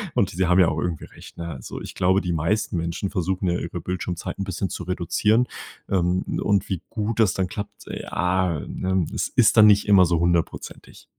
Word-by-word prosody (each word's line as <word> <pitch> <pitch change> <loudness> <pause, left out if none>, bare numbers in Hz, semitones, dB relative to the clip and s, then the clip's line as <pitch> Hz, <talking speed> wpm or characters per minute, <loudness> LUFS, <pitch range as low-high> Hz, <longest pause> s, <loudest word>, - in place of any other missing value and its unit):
und 95 - +2
sie 95 +2 0
haben 90 +2 +4
ja 90 -3 +6
auch 80 - -2
irgendwie 85 -3 -3
recht, - - -14
ne? 85 - -5
Also, 65 -6 -7
ich - - -8
glaube, 95 +2 +3
die 90 -1 -2
meisten 85 +5 0
Menschen 85 +4 -2
versuchen 95 0 -1
ja 85 - 0
ihre 85 0 -5
Bildschirmzeit 90 -1 -4
'n 100 - -1
bisschen 95 0 -3
zu - - -5
reduzieren, 105 +6 +1 0.4
ähm, 90 -1 +1 0.2
und 100 -2 +1
wie 95 -4 -2
gut 110 +1 -3
das 110 -5 +4
dann 95 -1 -1
klappt, 100 +2 -7
ja, 90 -3 -1
ne, 95 -2 -1
es - - -1
ist 120 -1 +3
dann 110 -1 +9
nicht 105 0 +4
immer 95 -3 +7
so 85 -1 +1
hundertprozentig. 85 -1 -2
90 Hz, 205 wpm, -23 LUFS, 85-100 Hz, 0.4 s, dann